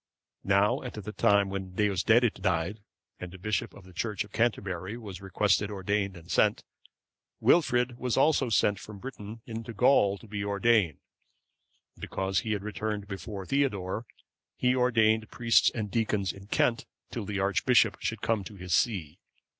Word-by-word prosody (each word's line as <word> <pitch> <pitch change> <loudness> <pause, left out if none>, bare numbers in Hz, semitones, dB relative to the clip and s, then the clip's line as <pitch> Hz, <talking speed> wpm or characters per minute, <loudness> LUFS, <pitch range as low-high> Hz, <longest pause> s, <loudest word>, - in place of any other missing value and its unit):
Now 100 +1 +3
at - - -7
the 105 0 -6
time 100 -3 +3
when 95 -2 -5
Deusdedit 105 +3 +2
died, 90 +2 0 0.4
and 90 -1 -7
a - - -9
bishop 105 +3 -2
for 100 - -15
the 90 0 -15
church 105 +2 -2
of 100 - -16
Canterbury 100 -3 -1
was 100 -6 -8
by 100 - -11
request 100 +1 +2
ordained 100 -1 -2
and 85 0 -11
sent, - - +2 0.8
Wilfrid 125 -7 +3
was 125 -2 -1
also 135 -2 +3
sent 105 -2 +2
from 105 -1 -10
Britain 110 -1 -8
into 115 0 -6
Gaul 100 -5 +4
to 115 - -15
be 100 -1 -4
ordained; 100 - +2 1.0
and - - -20
because 95 -2 -1
he 110 +1 -1
returned 105 0 -4
before 100 0 -6
Theodore, 110 -5 -1 0.5
he 125 0 +2
ordained 110 -3 +2
priests 115 -1 +3
and 105 -3 -5
deacons 105 -4 0
in 100 0 -13
Kent 115 +2 +1 0.2
till 115 -4 -4
the 100 0 -3
archbishop 100 +2 +3
should 115 -2 -3
come 110 -3 +1
to 105 - -9
his 90 -2 -4
see. 85 -6 0
105 Hz, 160 wpm, -28 LUFS, 95-115 Hz, 1.0 s, Gaul